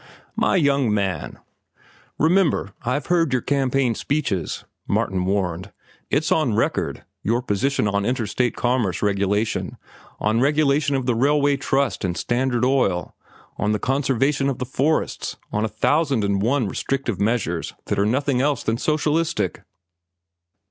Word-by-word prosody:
"My - - +2
young 140 - +2
man—" 95 -6 -2 0.8
"Remember, 160 - +2
I've 130 +4 -1
heard 170 -4 +2
your 130 -1 0
campaign 135 -3 +1
speeches," 110 - -2 0.2
Martin 95 -1 0
warned. 95 -1 -1 0.4
"It's 150 +2 +1
on 135 -9 +2
record, 115 - -1 0.2
your 120 +4 0
position 105 +1 0
on 100 0 0
interstate 120 +1 0
commerce 120 -8 0
regulation, 105 +1 0 0.4
on 110 +2 +1
regulation 145 0 +2
of 130 -2 -1
the 125 - +2
railway 140 +4 +3
trust 135 -1 0
and 90 -2 -1
Standard 120 +4 0
Oil, 110 -10 +1 0.4
on 105 0 0
the - - +1
conservation 135 +3 +1
of 135 - -2
the 125 - -3
forests, 140 +5 -1
on 105 - 0
a - - +1
thousand 135 +3 +1
and 100 -1 +1
one 125 +1 +1
restrictive 120 -1 -2
measures 100 -7 -1
that - - -1
are 100 - +3
nothing 130 +2 +1
else 145 -1 0
than 115 +1 -1
socialistic." 155 +2 0
125 Hz, 140 wpm, -22 LUFS, 105-140 Hz, 0.8 s, railway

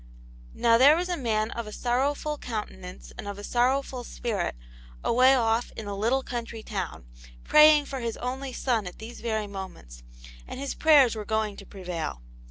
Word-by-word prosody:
Now, 230 -1 +4
there 285 +4 +8
was 355 +2 -2
a 355 - 0
man 220 -6 -1
of 235 -2 -5
a - - -7
sorrowful 280 +6 -1
countenance 190 -5 -7
and 205 - -6
of 200 -1 -5
a 205 - -8
sorrowful 255 +2 0
spirit 220 - -3 0.5
away 255 +3 +5
off 230 -1 +1
in 220 - -5
a 200 0 -4
little 235 +7 +1
country 230 -3 -5
town, 190 - -5 0.4
praying 300 -1 +7
for 270 -1 -5
his 230 -2 -3
only 260 +2 -4
son 235 -6 -1
at 180 - -9
these 230 +2 -9
very 220 -2 -1
moments, 190 - -9 0.5
and - - -7
his 275 0 -3
prayers 285 -7 +5
were 215 - -4
going 220 -1 -1
to - - -11
prevail. 175 - -5
230 Hz, 180 wpm, -27 LUFS, 205-265 Hz, 0.5 s, there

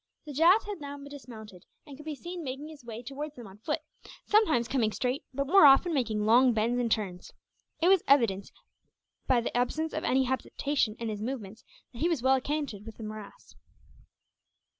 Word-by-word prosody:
The 295 - -7
Jat 340 +9 +5
had 410 -5 -7
now 285 0 -6
dismounted, 240 -9 -11 0.2
and 285 - -11
could 300 +3 -13
be 305 - -3
seen 345 +5 -7
making 275 +3 -6
his 305 -4 -13
way 235 0 -8
towards 290 +4 -6
them 240 - -10
on 195 +1 -13
foot; 300 +7 -2 0.4
sometimes 320 - +3
coming 240 -4 +1
straight, 255 +5 -2
but 275 +2 -2
more 325 +1 +7
often 280 +6 +5
making 220 -7 0
long 245 +3 +5
bends 230 +3 +1
and 235 -2 -1
turns. 190 -5 -2 0.5
It - - +5
was 380 -2 +5
evident, 230 -8 +3 0.8
by 250 -2 +3
the 235 - -4
absence 315 +6 0
of - - -3
any 265 +1 +2
hesitation 260 -2 -1
in 230 -1 -4
his 210 -1 -5
movements, 220 -3 -6 0.3
that 235 - -10
he 335 - +2
was 315 -8 -1
well 260 0 +5
acquainted 275 -6 -3
with 225 0 -11
the 225 - -8
morass. 215 - -9
260 Hz, 190 wpm, -29 LUFS, 225-295 Hz, 0.8 s, more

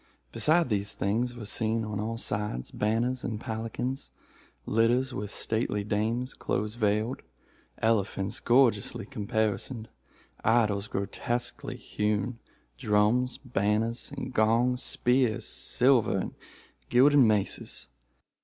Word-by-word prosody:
Besides 165 +2 +3
these 100 -2 0
things, 120 +5 0
were 115 -3 -7
seen, 110 +1 0
on 105 -1 -4
all 115 +2 -2
sides, 105 - -3
banners 120 +4 0
and 110 -3 -3
palanquins, 115 +4 -4 0.6
litters 120 +4 +2
with 105 -3 -4
stately 110 -1 -1
dames 110 +5 -1
close 105 +2 -2
veiled, 110 +1 0 0.6
elephants 100 -3 0
gorgeously 120 -2 +2
caparisoned, 110 +2 -2 0.5
idols 105 -3 +2
grotesquely 105 +5 -3
hewn, 105 +3 -2 0.4
drums, 115 +2 +2
banners, 110 +1 0
and 135 - -5
gongs, 120 +3 +2
spears, 125 -3 +1
silver 125 -6 +3
and 95 - -3 0.6
gilded 140 +4 +6
maces. 110 -6 +1
110 Hz, 105 wpm, -28 LUFS, 105-125 Hz, 0.6 s, gilded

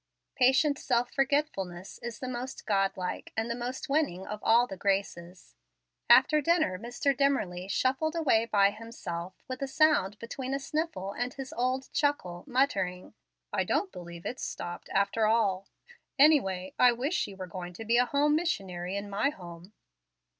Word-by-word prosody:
Patient 265 +3 +3
self 245 -1 0
forgetfulness 265 - -1
is 235 -1 -6
the 255 - -6
most 250 +1 -5
God 195 -2 +1
like 180 -1 -4
and 225 +1 -1
the - - -1
most 245 +2 -5
winning 275 - 0
of 210 - -5
all 235 +2 +5
the 195 - -7
graces. 185 -2 -2 0.6
After 305 -1 +6
dinner, 315 - +2
Mr. 245 +4 -1
Dimmerly 200 -10 0
shuffled 265 - 0
away 255 -9 +3
by 200 -3 +4
himself, 190 -6 -7
with 255 0 -6
a 275 - -1
sound 280 -9 +3
between 255 +4 -4
a - - -2
sniffle 300 - -3
and 245 +3 -3
his 270 -1 -7
old 255 +2 -1
chuckle, 185 - 0
muttering, 200 -9 0 0.4
"I - - +2
don't 390 - 0
believe 170 -1 -10
it's 255 - -4
'stopped,' 175 - -6
after 200 +3 +2
all. 200 -4 +1 0.5
Anyway, 195 -12 +4
I 250 -1 +7
wish 265 +8 -2
she 205 - -1
were 190 -1 -6
going 180 0 -7
to 225 +6 -8
be 230 +2 +3
a 250 - +4
home 290 +3 +2
missionary 190 - -2
in 200 +1 -5
my 200 +7 +1
home." 175 - -11
230 Hz, 165 wpm, -29 LUFS, 190-275 Hz, 0.6 s, I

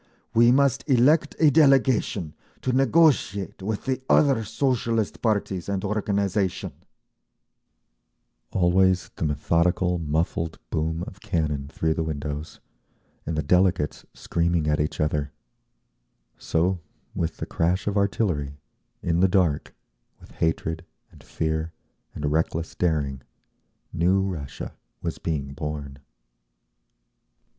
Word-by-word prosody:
We 120 +1 +6
must 140 0 +3
elect 145 +4 +4
a 155 -2 +5
delegation 130 - +3 0.3
to 130 - 0
negotiate 130 - +2
with 105 +2 -3
the 130 -1 -1
other 135 -6 +4
Socialist 115 -1 -1
parties 100 -5 -1
and 100 0 -2
organisation…." 100 -2 -1 1.8
Always 90 0 +2
the - - -1
methodical 85 +4 +1
muffled 80 +1 -1
boom 80 +2 -1
of 100 0 -11
cannon 75 -4 -1
through 80 +2 -1
the 80 - -2
windows, 75 0 -5 0.7
and 80 0 -2
the 75 - 0
delegates, 90 -1 +2
screaming 85 -2 0
at 75 0 +1
each 75 +1 -1
other…. 75 -1 -1 1.0
So, 90 +3 0 0.3
with 80 - -2
the - - -4
crash 90 +4 0
of 105 - -1
artillery, 90 -8 0 0.5
in 85 0 +1
the 95 - +5
dark, 90 -6 +1 0.4
with - - -16
hatred, 80 0 -1 0.3
and - - -17
fear, 80 0 -2 0.4
and 75 -1 -2
reckless 80 +1 -1
daring, 75 -6 -1 0.7
new 90 +4 +3
Russia 80 -8 -5 0.3
was - - -3
being 70 -4 -3
born. 75 -2 -5
85 Hz, 115 wpm, -25 LUFS, 80-105 Hz, 1.8 s, We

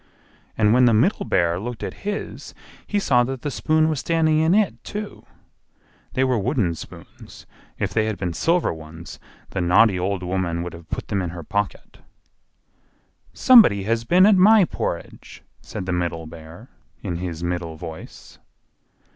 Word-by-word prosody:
And 105 -1 +3
when 125 +1 +5
the 115 -2 +4
Middle 130 - +1
Bear 85 0 +1
looked 120 +1 -6
at - - -4
his, 205 0 -6 0.3
he 205 - -1
saw 125 -11 +3
that 130 0 -6
the 145 - -2
spoon 155 +5 +1
was 155 -3 -1
standing 160 -1 +1
in 160 +4 +3
it, 210 -1 0
too. 210 0 -7 0.9
They 130 - +1
were 130 -3 +1
wooden 95 -3 0
spoons; 80 - -12 0.3
if - - -3
they 110 -1 +1
had 110 -2 -3
been 90 -2 -3
silver 170 - +1
ones 80 +1 -11 0.3
the 95 - -2
naughty 90 +3 +4
old 95 +1 -2
woman 90 -2 -2
would 90 - -7
have 85 -1 -13
put - - -5
them 100 -2 0
in 90 - -3
her 85 0 -8
pocket. 105 +3 -4 1.3
"SOMEBODY 215 - +6
HAS 115 +3 -1
BEEN 180 +7 +5
AT 210 -1 +6
MY 205 +1 +6
PORRIDGE!" 85 - -6 0.2
said - - -7
the 90 - -2
middle 85 -2 -2
Bear, 80 +8 -12 0.3
in 90 -4 -3
his 85 -2 -5
middle 85 -2 -3
voice. 80 0 -11
105 Hz, 165 wpm, -22 LUFS, -, 1.3 s, SOMEBODY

